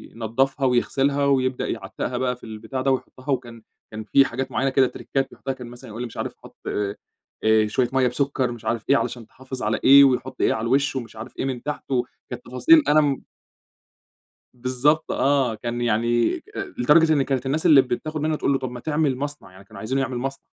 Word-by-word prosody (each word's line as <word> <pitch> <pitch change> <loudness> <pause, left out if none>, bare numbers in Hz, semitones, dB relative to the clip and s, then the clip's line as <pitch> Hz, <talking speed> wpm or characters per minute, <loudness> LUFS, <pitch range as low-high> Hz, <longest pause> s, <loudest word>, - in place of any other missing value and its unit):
ينضفها 135 +5 0
ويغسلها 135 +3 +1
ويبدأ 130 -2 +1
يعتّقها 110 +3 -4
بقى 125 0 0
في 120 - -25
البتاع 110 +3 -6
ده 135 +1 +2
ويحطها، 130 +1 -4
وكان 120 -3 -3 0.3
كان 110 0 -6
في 135 +5 +4
حاجات 130 +2 -4
معيّنة 135 +1 +1
كده 130 -1 +4
تِرِكّات 135 +2 -3
يحطها، 135 - -5
كان 125 -2 -10
مثلًا 120 0 -12
يقُول 110 +3 -7
لي - - -2
مش 115 - -13
عارف - - -3
حُط - - -15
آآ، 105 +1 -1
شوية 120 +3 0
مَيّة 130 -1 +3
بسكر، 130 0 -1
مش 120 -2 -10
عارف 115 -2 -2
إيه 140 - +6
علشان 120 -5 -4
تحافظ 130 +1 -8
على 105 +1 0
إيه، 140 +1 +9
ويحط 130 -1 +1
إيه - - +3
على 110 - -3
الوش 135 +3 +1
ومش 120 -4 -5
عارف 110 +4 -10
إيه - - -1
من 130 -3 -4
تحته، 135 -4 -2 0.3
كانت 125 0 -7
تفاصيل 305 - +5
أنا 155 +1 +5
م 140 -2 -1 1.3
بالضبط 130 +5 0
آه، 135 -4 +1
كان 120 +2 -4
يعني 120 0 +1 0.4
لدرجة 155 +5 +5
إن 145 - +2
كانت 135 -1 -2
الناس 150 +5 -1
اللي 150 -5 +8
بتاخد 150 +5 -4
منه 155 +1 0
تقُول 140 - 0
له 135 - +1
طب 130 -2 -4
ما 125 - -7
تعمل 150 -1 0
مصنع، 145 -6 -6
يعني 95 +1 -15
كانوا 110 -3 -12
عايزينه 130 +6 -1
يعمل 130 -1 -2
مصنع، 135 +2 -5
130 Hz, 205 wpm, -23 LUFS, 120-140 Hz, 1.3 s, إيه